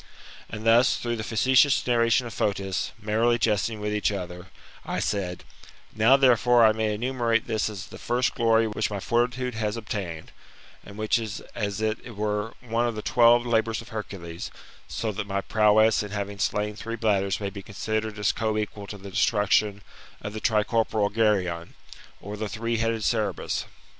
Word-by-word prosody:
And 110 Hz, +1 st, -7 dB
thus, 115 Hz, +3 st, +5 dB
through 120 Hz, -1 st, -3 dB
the 110 Hz, -, -4 dB
facetious 130 Hz, +5 st, +3 dB
narration 120 Hz, 0 st, +3 dB
of 115 Hz, -, -7 dB
Fotis, 100 Hz, -2 st, -1 dB
merrily 110 Hz, +3 st, +2 dB
jesting 110 Hz, -1 st, 0 dB
with 105 Hz, 0 st, -2 dB
each 105 Hz, 0 st, +1 dB
other, 90 Hz, -2 st, -6 dB, 0.4 s
I -, -, -3 dB
said, 90 Hz, -4 st, -2 dB, 0.5 s
Now, 115 Hz, +5 st, +5 dB
therefore, 125 Hz, -3 st, +5 dB
I 110 Hz, -, +6 dB
may 110 Hz, -1 st, -1 dB
enumerate 120 Hz, -1 st, 0 dB
this 110 Hz, -2 st, -1 dB
as 100 Hz, -2 st, -7 dB
the -, -, -12 dB
first 120 Hz, +1 st, 0 dB
glory 115 Hz, -1 st, +3 dB
which 110 Hz, 0 st, -1 dB
my 100 Hz, -1 st, -4 dB
fortitude 125 Hz, +3 st, 0 dB
has 110 Hz, 0 st, -2 dB
obtained, 95 Hz, -8 st, -5 dB, 0.5 s
and 100 Hz, 0 st, -12 dB
which 110 Hz, +2 st, +1 dB
is 110 Hz, -2 st, -5 dB
as 100 Hz, -2 st, -3 dB
it 110 Hz, +1 st, -3 dB
were 105 Hz, +1 st, -2 dB
one 120 Hz, 0 st, 0 dB
of 115 Hz, -, -3 dB
the 105 Hz, -, -5 dB
twelve 120 Hz, 0 st, +5 dB
labours 115 Hz, -1 st, +1 dB
of 115 Hz, -, -10 dB
Hercules; 90 Hz, -6 st, -6 dB, 0.4 s
so 110 Hz, -, -3 dB
that 100 Hz, 0 st, -5 dB
my 100 Hz, 0 st, -1 dB
prowess 110 Hz, +1 st, +4 dB
in 105 Hz, -, -5 dB
having 100 Hz, 0 st, -4 dB
slain 105 Hz, +1 st, -1 dB
three 115 Hz, +1 st, -5 dB
bladders 100 Hz, -4 st, +1 dB
may 100 Hz, -2 st, -3 dB
be 100 Hz, 0 st, -8 dB
considered 110 Hz, +2 st, -3 dB
as 105 Hz, -1 st, +2 dB
co 110 Hz, -1 st, -1 dB
equal 105 Hz, -1 st, -4 dB
to 105 Hz, -, -7 dB
the 100 Hz, 0 st, -10 dB
destruction 105 Hz, 0 st, +2 dB, 0.4 s
of 105 Hz, -, -6 dB
the 110 Hz, -, -6 dB
tricorporal 110 Hz, -1 st, +1 dB
Geryon, 95 Hz, -7 st, 0 dB, 0.4 s
or 105 Hz, +1 st, -7 dB
the 105 Hz, 0 st, -4 dB
three 115 Hz, +2 st, -2 dB
headed 115 Hz, -1 st, -1 dB
Cerberus. 105 Hz, -7 st, -1 dB
110 Hz, 175 wpm, -26 LUFS, 105-115 Hz, 0.5 s, I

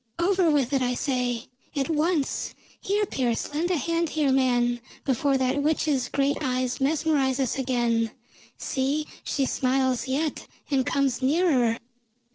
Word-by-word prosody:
"Over 365 Hz, 0 st, +3 dB
with 285 Hz, -3 st, +1 dB
it, 270 Hz, -, +2 dB
I 250 Hz, 0 st, +1 dB
say! 250 Hz, -3 st, -1 dB, 0.3 s
At 275 Hz, -2 st, 0 dB
once! 320 Hz, -2 st, 0 dB, 0.3 s
Here, 410 Hz, +2 st, +1 dB
Pearse, 250 Hz, -, -2 dB
lend 325 Hz, +4 st, 0 dB
a 360 Hz, -, +2 dB
hand 335 Hz, +3 st, 0 dB
here, 295 Hz, -3 st, +1 dB
man, 245 Hz, -2 st, +2 dB, 0.3 s
before 275 Hz, +1 st, +2 dB
that 260 Hz, +2 st, +1 dB
witch's 290 Hz, -3 st, +1 dB
great 280 Hz, 0 st, +1 dB
eyes 255 Hz, -1 st, -1 dB
mesmerize 285 Hz, -2 st, +1 dB
us 265 Hz, +1 st, 0 dB
again. 240 Hz, -3 st, +1 dB, 0.5 s
See, 280 Hz, +3 st, -1 dB, 0.2 s
she 275 Hz, -, 0 dB
smiles 260 Hz, -1 st, +1 dB
yet, 290 Hz, +4 st, -2 dB, 0.2 s
and 265 Hz, -2 st, +2 dB
comes 270 Hz, -3 st, +1 dB
nearer." 260 Hz, -5 st, +2 dB
270 Hz, 140 wpm, -26 LUFS, 255-305 Hz, 0.5 s, Over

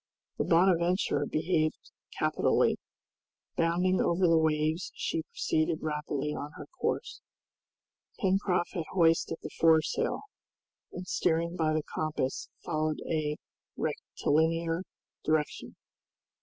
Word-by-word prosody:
The -, -, +1 dB
"Bonadventure" 175 Hz, +1 st, +3 dB
behaved 155 Hz, -1 st, 0 dB, 0.3 s
capitally. -, -, +2 dB, 0.8 s
Bounding 180 Hz, +2 st, +2 dB
over 175 Hz, +1 st, +3 dB
the 165 Hz, -1 st, +5 dB
waves 155 Hz, +2 st, +1 dB
she 165 Hz, -, -1 dB
proceeded 160 Hz, +1 st, -1 dB
rapidly 150 Hz, -1 st, -2 dB
on 150 Hz, +1 st, -6 dB
her -, -, -9 dB
course. -, -, -2 dB, 1.0 s
Pencroft 190 Hz, -2 st, +1 dB
had 170 Hz, -5 st, -2 dB
hoisted 165 Hz, -2 st, +3 dB
the -, -, -6 dB
foresail, 160 Hz, -2 st, +3 dB, 0.7 s
and 180 Hz, -, -6 dB
steering 170 Hz, 0 st, +1 dB
by 155 Hz, -2 st, +1 dB
the 155 Hz, -1 st, 0 dB
compass 150 Hz, -5 st, -2 dB, 0.2 s
followed 155 Hz, -1 st, 0 dB
a 150 Hz, -2 st, 0 dB, 0.4 s
rectilinear 165 Hz, +2 st, 0 dB, 0.4 s
direction. 155 Hz, -1 st, -1 dB
165 Hz, 100 wpm, -30 LUFS, 155-175 Hz, 1.0 s, the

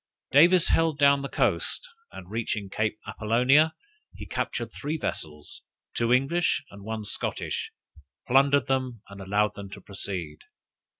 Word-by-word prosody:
Davis 170 Hz, +5 st, +6 dB
held 165 Hz, -2 st, +2 dB
down 140 Hz, -1 st, +5 dB
the 140 Hz, -, -5 dB
coast, -, -, 0 dB, 0.2 s
and 90 Hz, -, -10 dB
reaching 110 Hz, -3 st, -3 dB
Cape 110 Hz, 0 st, -1 dB
Appolonia 125 Hz, +8 st, +3 dB, 0.4 s
he -, -, -8 dB
captured -, -, -3 dB
three 150 Hz, +2 st, -4 dB
vessels, 75 Hz, -, -5 dB, 0.3 s
two 120 Hz, 0 st, +1 dB
English 140 Hz, +8 st, +2 dB
and 100 Hz, 0 st, -12 dB
one 110 Hz, 0 st, -5 dB
Scottish, -, -, -3 dB, 0.5 s
plundered 140 Hz, +2 st, +4 dB
them, 130 Hz, -5 st, -2 dB
and 100 Hz, 0 st, -10 dB
allowed 100 Hz, +2 st, +1 dB
them 100 Hz, -1 st, -9 dB
to -, -, -9 dB
proceed. 90 Hz, -6 st, -5 dB
120 Hz, 135 wpm, -27 LUFS, 100-140 Hz, 0.5 s, Davis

